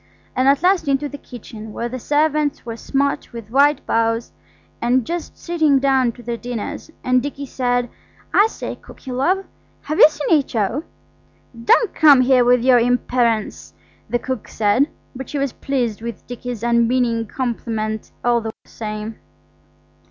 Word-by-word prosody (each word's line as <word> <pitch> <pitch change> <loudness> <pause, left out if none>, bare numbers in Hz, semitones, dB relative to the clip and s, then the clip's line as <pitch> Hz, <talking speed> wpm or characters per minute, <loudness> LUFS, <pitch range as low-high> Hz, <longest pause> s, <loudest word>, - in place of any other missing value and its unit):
And 255 +1 +2
at 280 +3 +4
last 365 -3 +3
into 280 +1 +1
the 285 0 -9
kitchen, 220 -3 -10
where 235 - -3
the 255 +2 -5
servants 300 +1 +1
were 230 -1 -5
smart 280 +4 -1
with 230 -2 -9
white 285 +2 +3
bows 230 0 0 0.5
and 245 0 +2
just 345 +3 -5
sitting 315 -5 +2
down 265 -2 +2
to 240 - -14
their 235 0 -3
dinner, 240 -2 -4 0.3
and 255 0 +3
Dicky 285 0 -5
said– 245 -2 0 0.5
"I 415 - +6
say, - - -6
cookie 265 - -11
love, 360 +10 +1 0.4
have 305 +1 -3
you - - +10
seen 300 +1 +2
H.O.?" 240 +1 -1 0.8
"Don't 445 - +4
come 290 -5 +7
here 255 -1 +4
with 245 0 +4
your 255 -1 +6
imperence!" 235 - 0 0.3
the 240 - +1
cook 260 -1 -5
said, 220 +7 +2 0.3
but 265 0 -7
she 295 - -3
was 275 -2 -1
pleased 245 -6 -2
with 235 0 -7
Dicky's 245 -2 -6
unmeaning 235 -1 +2
compliment 220 -3 -3 0.2
all 240 -1 +3
the 225 - -4 0.2
same. 215 0 -6
250 Hz, 155 wpm, -20 LUFS, 230-280 Hz, 0.8 s, you